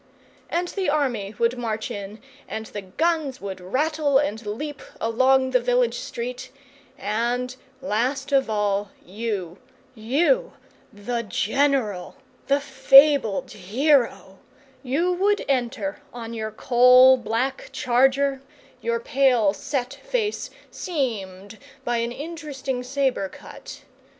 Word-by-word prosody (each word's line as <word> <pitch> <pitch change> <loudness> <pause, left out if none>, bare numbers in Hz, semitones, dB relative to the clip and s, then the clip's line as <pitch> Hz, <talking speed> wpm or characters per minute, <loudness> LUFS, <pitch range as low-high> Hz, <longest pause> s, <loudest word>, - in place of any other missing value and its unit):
And 350 +1 -1
the 385 -3 -1
army 240 -9 -1
would 235 +2 +1
march 220 -2 -3
in, 205 +1 -7 0.3
and 220 0 -5
the 205 - -7
guns 290 - -1
would 190 -2 -6
rattle 290 - +1
and 230 -6 -1
leap 275 +8 -5 0.2
along 260 +3 +3
the 250 - +4
village 245 -1 +1
street, 245 +1 -6 0.5
and, 240 +4 -1 0.3
last 270 +3 -1
of 270 -3 +3
all, 205 -1 0 0.2
you 195 -3 -4 0.3
you, 315 - +1 0.4
the 235 +4 -3
General, 230 -2 0 0.3
the 280 +1 +3
fabled 275 -4 +5
hero 225 0 +1 0.4
you 300 +8 0
would 400 +3 +1
enter, 275 +3 -1
on 235 -2 -7
your 220 -1 -3
coal 250 +3 +6
black 240 +2 -2
charger, 270 +2 +2 0.4
your 470 0 -1
pale 265 - +3
set 255 +4 -3
face 420 - -3 0.2
seamed 215 - -4 0.3
by 240 0 0
an 235 +1 -1
interesting 285 -3 -5
sabre 260 -6 -1
cut. - - -11
250 Hz, 115 wpm, -24 LUFS, 220-280 Hz, 0.5 s, coal